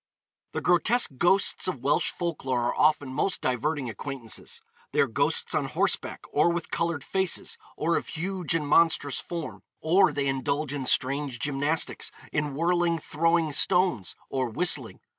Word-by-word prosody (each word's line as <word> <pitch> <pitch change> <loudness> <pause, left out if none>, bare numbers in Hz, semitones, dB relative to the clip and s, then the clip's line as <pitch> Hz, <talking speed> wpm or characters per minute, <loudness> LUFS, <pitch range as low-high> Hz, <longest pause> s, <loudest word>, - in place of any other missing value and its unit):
The - - -3
grotesque 200 +7 +2
ghosts 190 +2 +3
of 150 -9 -4
Welsh 145 +2 +2
folk 170 -3 -4
lore 130 -2 0
are 120 - -1
often 150 -3 +2
most 190 +7 -1
diverting 135 +2 -1
acquaintances. 120 +1 -7 0.3
They - - 0
are - - +5
ghosts - - +2
on - - 0
horseback, - - -1
or 150 +4 +3
with 170 -1 -3
coloured 165 -4 -1
faces, 190 +1 -1 0.2
or 165 +2 +1
of - - -5
huge 180 0 -3
and 150 -3 -1
monstrous 150 -3 +3
form; 170 -3 -6 0.2
or 185 +5 +3
they 140 -1 -2
indulge 140 +2 -1
in 135 -3 -4
strange 135 0 0
gymnastics, 145 +4 0 0.2
in 150 -2 -1
whirling, 170 +1 +1
throwing 165 +1 0
stones, 180 - +2
or 130 -2 -2
whistling. 130 -2 +3
150 Hz, 155 wpm, -26 LUFS, 135-170 Hz, 0.3 s, are